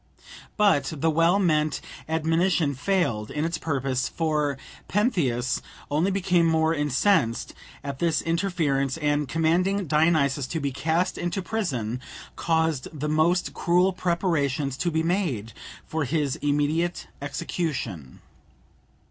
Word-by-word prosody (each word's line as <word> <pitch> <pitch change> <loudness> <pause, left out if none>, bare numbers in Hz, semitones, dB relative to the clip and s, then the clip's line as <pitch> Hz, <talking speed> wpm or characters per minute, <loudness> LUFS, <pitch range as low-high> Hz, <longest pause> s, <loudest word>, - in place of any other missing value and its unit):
But 200 -7 +3
the 160 +3 +2
well 165 +4 +4
meant 155 -6 +1 0.3
admonition 160 0 +1
failed 135 - 0
in 150 +1 -2
its 165 -1 -2
purpose, 135 -4 -1
for 150 -4 0 0.3
Pentheus 150 - +1 0.3
only 160 +6 +2
became 180 -3 +2
more 160 0 +2
incensed 145 - +1 0.3
at 140 -1 -5
this 170 -2 +2
interference, 165 -6 0
and, 145 -3 0
commanding 180 +6 +1
Dionysus 150 -3 +2
to 160 - -3
be 140 -2 -1
cast 160 +6 0
into 175 +2 -2
prison, 130 - -2 0.3
caused 160 -5 0
the 150 -1 -4
most 160 +4 +2
cruel 180 +2 +2
preparations 155 -7 0
to 175 - 0
be 160 -1 0
made 165 - -1 0.3
for 160 -1 -2
his 145 0 0
immediate 150 +4 0 0.2
execution. 135 - -4
160 Hz, 120 wpm, -25 LUFS, 140-175 Hz, 0.3 s, well